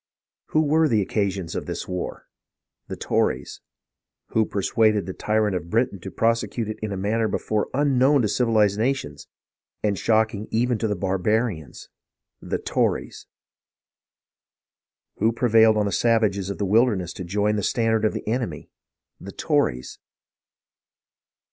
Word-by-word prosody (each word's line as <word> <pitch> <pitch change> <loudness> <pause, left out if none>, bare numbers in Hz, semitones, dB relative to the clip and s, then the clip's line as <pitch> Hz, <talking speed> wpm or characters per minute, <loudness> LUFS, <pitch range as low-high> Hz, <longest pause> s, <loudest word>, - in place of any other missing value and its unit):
Who 155 - +2
were 155 +2 +3
the 110 -7 +2
occasion 100 -2 -1
of - - -4
this - - -5
war 90 -1 -5 0.6
.■' - - -53
The - - -5
Tories! - - -1 0.7
Who 110 -1 +1
persuaded 105 0 +1
the 95 - -5
tyrant 105 -1 0
of 85 -1 -4
Britain 115 -2 0
to 95 - -7
prosecute 115 +2 0
it 110 - -5
in 110 -1 -4
a 100 - -3
manner 110 +4 0
before 105 +1 -1
unknown 135 -1 +3
to - - +2
civilized 105 -2 +2
nations, 110 - -2 0.6
and 100 -3 0
shocking 110 -1 +1
even 120 0 0
to 110 -2 0
barba 95 +1 -1
rians? 80 - -6 0.5
The - - -2
Tories! - - -2 1.9
Who 110 +2 +2
prevailed 110 -2 +4
on 105 - +2
the 100 - -1
savages 105 -5 +1
of 100 - -4
the 100 - -1
wilderness 100 -4 +2
to - - -7
join 105 +4 0
the 105 - -1
standard 110 +1 +1
of 110 - +2
the - - -6
enemy.'' 110 - -3 0.5
The - - -9
Tories 60 +1 -1
110 Hz, 145 wpm, -24 LUFS, 100-115 Hz, 1.9 s, prevailed